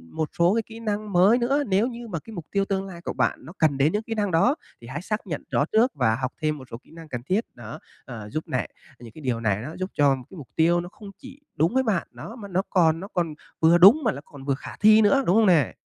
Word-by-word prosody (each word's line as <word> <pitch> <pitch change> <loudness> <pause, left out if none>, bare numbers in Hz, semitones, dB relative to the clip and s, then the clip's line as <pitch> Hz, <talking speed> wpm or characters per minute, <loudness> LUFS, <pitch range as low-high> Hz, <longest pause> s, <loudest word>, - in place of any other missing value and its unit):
một 155 -1 -2
số 170 +2 +4
cái 230 - +2
kỹ 225 0 -11
năng 210 -2 -3
mới 190 +6 +5
nữa. 270 +4 +1
Nếu 200 +4 +2
như 240 -1 -7
mà 175 -7 -4
cái 225 - -13
mục 170 -6 -7
tiêu 200 -1 +1
tương 195 -1 -2
lai 175 -3 -10
của - - -4
bạn 125 0 0
nó 160 - -10
cần 150 -4 +2
đến 140 +3 +3
những 210 +1 -1
kỹ 225 - -5
năng 205 -3 -1
đó, 180 - +3 0.3
thì 115 - -12
hãy 135 +5 -5
xác 210 +2 -4
nhận 155 -5 -4
rõ 145 - +2
trước 235 +4 +3
và 110 -5 +2
học 130 +1 -3
thêm 155 -1 0
một 130 - -11
số 115 - -6
kỹ - - -22
năng 165 -1 -12
cần 120 -4 -5
thiết, 195 - 0
đó. 115 -2 -9 0.3
Ờ, 110 -5 -8
giúp 155 +8 -4
này 130 - -1 0.4
những 120 -2 -11
cái 155 - -12
điều 125 -4 -1
này 105 -3 0
nó 150 +7 -7
giúp 185 +1 -3
cho 140 -2 +3
cái 190 - -12
mục 145 -6 -10
tiêu 170 +2 +3
nó 175 - -8
không 205 +1 -12
chỉ 265 +1 -13 0.2
đúng 165 +6 +1
với 260 0 +2
bạn, 210 -8 -1
đó, 225 - -9
mà 215 -5 -9
nó 190 -1 0
còn 165 -3 +3
nó 195 - -7
còn 170 -3 -1 0.3
vừa 165 +2 +5
đúng 205 - +7
mà 225 - +2
nó 140 - -8
còn 140 -2 -13
vừa 140 - +1
khả 135 - -10
thi 215 +1 +6
nữa, 270 +6 +4
đúng 180 - +3
không 225 0 +5
nè? 165 - +3
175 Hz, 290 wpm, -24 LUFS, 145-215 Hz, 0.4 s, đúng